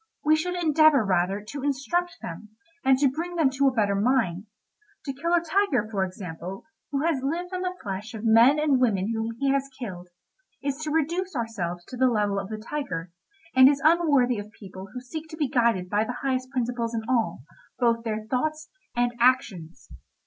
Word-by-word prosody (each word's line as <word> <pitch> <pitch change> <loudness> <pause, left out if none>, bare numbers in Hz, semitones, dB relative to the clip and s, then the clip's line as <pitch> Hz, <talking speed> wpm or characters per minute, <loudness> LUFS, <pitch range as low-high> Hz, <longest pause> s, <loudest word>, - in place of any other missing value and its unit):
We 310 +1 +5
should 360 +3 -2
endeavour, 310 -6 +4
rather, 190 +2 +1
to 285 - -5
instruct 330 +6 -1
them, 170 +6 -7 0.3
and 265 0 +5 0.2
bring 350 +4 -4
them 310 -6 +3
to 275 +1 +2
a - - +4
better 210 -5 +1
mind. 205 -3 +1 0.6
To 275 - -3
kill 330 +6 -3
a 345 - +3
tiger, 325 - +1
for 195 -3 0
example, 185 0 -6 0.3
who 280 0 -1
has 320 -6 +1
lived 345 +7 -3
on 365 - -2
the 365 0 -2
flesh 205 +3 -5
of 215 - -7
men 230 +6 +6
and 295 -4 +2
women 215 -3 +1
whom 225 0 -3
he 275 +2 +1
has 275 0 0
killed, 185 -8 -7 0.6
is 280 -1 -1
to 310 0 -4
reduce 335 +4 -1
ourselves 180 -8 -3
to 255 - -9
the 260 +1 +4
level 205 -3 +1
of 195 0 -6
the 215 - -4
tiger, 215 - -5 0.4
and 260 +1 +9
is 280 -1 +1
unworthy 290 -8 +4
of 205 +1 -8
people 190 -1 -9
who 250 - -7
seek 315 +5 -7
to 315 - -9
be 300 -3 +1
guided 235 -8 +1
by 205 +3 +1
the 245 +2 -5
highest 255 -1 -1
principles 240 -2 -2
in 225 - -2
all, 225 - 0 0.3
both 230 -2 +2
their 215 -1 -3
thoughts 305 +6 -2 0.3
and 240 0 +1
actions. 230 -10 +1
250 Hz, 190 wpm, -26 LUFS, 210-295 Hz, 0.6 s, and